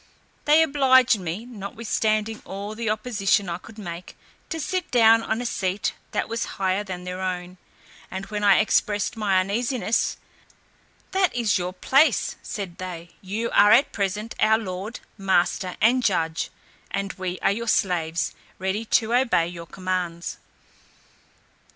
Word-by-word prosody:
They 305 +2 +6
obliged 260 -6 +4
me, 180 +5 -4
notwithstanding 220 -1 -2
all 200 +2 -6
the 225 0 -3
opposition 215 -3 +1
I 170 0 -3
could 220 +4 -14
make, 175 -4 -8 0.3
to 325 - -3
sit 365 +3 -2
down 225 -2 +6
on 225 +1 -2
a - - -6
seat 195 -4 -1 0.2
that - - -1
was 230 +1 -2
higher 190 +1 +1
than 185 -3 -6
their 180 +1 -5
own; 180 -1 -4 0.5
and 190 +1 -5
when 210 0 -4
I 200 -1 +6
expressed 205 -1 +1
my 200 -4 +2
uneasiness, 225 +3 0 0.9
"That 380 -5 +2
is 225 -5 +2
your 180 0 -2
place," 270 +11 +3
said 195 -5 -6
they, 175 -2 -7
"you 215 +5 -3
are 205 +1 +6
at 275 - +5
present 205 +2 -2
our 220 0 +5
lord, 200 +1 -6 0.2
master, 185 -1 +1
and 245 +4 +4
judge, 165 -6 0 0.4
and 195 0 -3
we 185 -1 -4
are - - +4
your 235 +3 -3
slaves, 170 -6 +1 0.2
ready 190 +4 -2
to 225 +1 +2
obey 235 -10 +3
your 170 -1 -8
commands." 180 -2 -3
205 Hz, 145 wpm, -24 LUFS, 185-230 Hz, 0.9 s, They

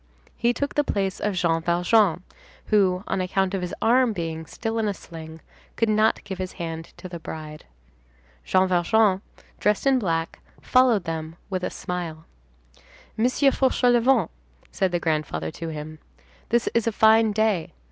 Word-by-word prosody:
He 235 +1 +2
took 280 +4 -3
the 295 - +2
place 195 -7 -2
of 210 -2 -1
Jean 165 -2 +1
Valjean, 180 +2 +2 0.5
who, 190 -3 +3
on 190 - -1
account 190 +1 0
of 195 - -1
his 180 - -4
arm 245 0 +4
being 165 -3 -4
still 225 0 -3
in 220 - 0
a 200 - -1
sling, 160 -2 -10 0.3
could 230 - +1
not 215 +1 +2
give 190 -2 -7
his 185 -1 -4
hand 165 -1 -5
to - - -8
the 175 -1 -7
bride. 155 -1 -8 0.8
Jean 190 0 +3
Valjean, 190 +2 +3 0.4
dressed 210 +3 +1
in 270 -1 +4
black, 165 -6 -2 0.2
followed 250 -6 +3
them 160 0 -5 0.2
with 185 -1 -2
a - - 0
smile. 170 -3 -5 0.9
"Monsieur 255 +4 +3
Fauchelevent," 250 -1 +3 0.4
said 190 -2 0
the 175 - 0
grandfather 150 - -2
to 165 - -7
him, 155 0 -7 0.5
"this 235 +1 +1
is 230 -1 +1
a - - +2
fine 220 0 +5
day. 210 -5 0
190 Hz, 160 wpm, -24 LUFS, 165-225 Hz, 0.9 s, fine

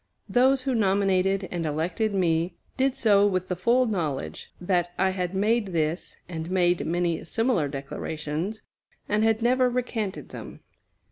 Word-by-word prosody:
Those 260 +1 +3
who 265 -1 0
nominated 195 -2 +2
and 175 -2 -2
elected 170 +8 -1
me 170 -1 +1 0.2
did 265 0 +1
so 205 -6 +4
with 185 -2 -1
the 180 - 0
full 235 +8 +3
knowledge 170 - -3
that 175 -1 0
I 190 0 +2
had 185 0 -3
made 215 +2 +2
this, 160 +1 -2
and 165 -1 -5
made 180 -1 +2
many 170 0 0
similar 225 - +1
declarations, 150 +7 -4 0.4
and 210 +1 +1
had 225 0 +2
never 255 +1 +3
recanted 235 -5 -3
them. - - -9
190 Hz, 145 wpm, -26 LUFS, 170-225 Hz, 0.4 s, so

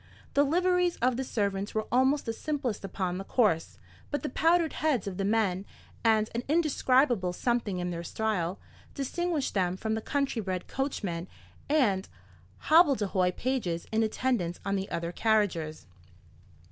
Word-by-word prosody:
The 285 - +5
liveries 360 +3 +2
of 250 0 +1
the 265 - -2
servants 200 -4 -2
were 215 - 0
almost 265 +3 +3
the 225 - -2
simplest 260 -6 -3
upon 185 -1 -3
the - - -4
course; 195 -7 +1 0.3
but 290 - -2
the 300 - -2
powdered 330 +2 +3
heads 295 -9 0
of 195 -2 -5
the 195 - -1
men, 200 -3 +1 0.4
and 220 -2 +4
an 235 - -1
indescribable 260 - +2
something 235 -2 -1
in 180 0 -2
their 170 -1 -4
style, 190 -2 -2 0.4
distinguished 315 +2 -1
them 185 -2 0
from 220 +2 -2
the 220 - -1
country 275 -2 -1
bred 185 -3 -3
coachmen 195 -11 -3 0.4
and 225 -11 +2 0.5
hobbledehoy 215 - +4
pages 225 -10 -1
in 220 0 +2
attendance 220 -6 0
on 200 0 0
the 195 0 -3
other 170 0 -3
carriages. 180 -8 0
220 Hz, 150 wpm, -29 LUFS, 190-270 Hz, 0.5 s, The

